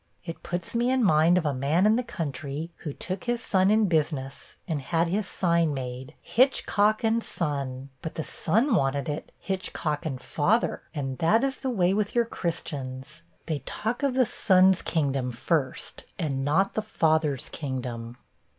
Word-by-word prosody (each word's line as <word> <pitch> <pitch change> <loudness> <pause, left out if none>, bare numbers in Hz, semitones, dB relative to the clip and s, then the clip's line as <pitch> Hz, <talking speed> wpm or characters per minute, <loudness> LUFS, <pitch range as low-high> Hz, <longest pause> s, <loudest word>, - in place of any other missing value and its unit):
It 165 -1 -6
puts 175 0 -3
me 240 +1 +2
in 260 -1 +2
mind 165 -1 +5
of 175 - 0
a 145 - +1
man 145 +8 +2
in 215 +1 +5
the 245 - +1
country, 150 - -4
who 150 - -5
took 185 +6 -5
his 240 0 0
son 190 -4 +2
in 215 +1 +4
business, 145 -5 -2
and 155 -4 -1
had 165 +4 0
his 200 +2 -1
sign 170 -4 +1
made, 130 0 -6
"Hitchcock 215 -3 +2
& - - +2
Son;" 140 - -3
but 160 - -6
the 160 - -2
son 225 - +1
wanted 140 -6 +1
it 150 0 -4
"Hitchcock 165 -6 -3
& 140 -5 -2
Father" 190 - +1
and 135 -3 -3
that 215 +9 +3
is 270 -1 0
the 265 - -3
way 190 -6 +2
with 210 +2 -1
your 235 -1 +4
Christians. 150 - -4 0.2
They 155 -4 -2
talk 220 - -3
of 275 -3 +1
the 260 -1 +4
Son's 190 -5 +4
kingdom 140 -5 0
first, 130 +3 -2
and 140 -7 -1
not 165 +8 +2
the 215 - 0
Father's 155 - +1
kingdom.' 125 -4 -5
165 Hz, 170 wpm, -27 LUFS, 140-205 Hz, 0.2 s, mind